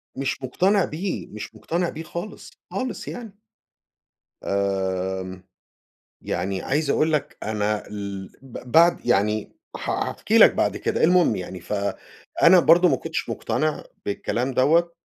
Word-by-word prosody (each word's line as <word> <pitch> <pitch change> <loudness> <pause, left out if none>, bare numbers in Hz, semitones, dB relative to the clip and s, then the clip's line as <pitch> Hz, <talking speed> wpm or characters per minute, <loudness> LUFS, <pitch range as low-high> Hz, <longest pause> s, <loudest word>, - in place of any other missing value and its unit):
مش 135 0 -2
مقتنع 190 +9 +2
بيه، 180 +5 -4
مش 105 - -9
مقتنع 170 +1 -2
بيه 160 +1 -7
خالص، 175 +6 -7 0.2
خالص 255 -1 -4
يعني. 225 -5 -8 1.1
آمم 95 -1 -2 0.8
يعني 95 +2 -2
عايز 145 +1 0
أقول 155 +1 +2
لك 145 -2 -1
أنا 105 -1 -1
ال 100 -2 -6
ب 125 -1 -10
بعد 170 +1 +5
يعني 105 -2 +1 0.2
ح - - -4
هاحكي - - 0
لك - - +8
بعد - - +1
كده - - 0
المهم 175 - +4
يعني، 90 0 -6
فأنا 100 - +1
برضه 170 +2 +6
ما 135 - +3
كنتش 130 - -4
مقتنع 155 0 -1 0.2
بالكلام 120 +5 -2
دوّة، 170 +6 +3
130 Hz, 130 wpm, -24 LUFS, -, 1.1 s, لك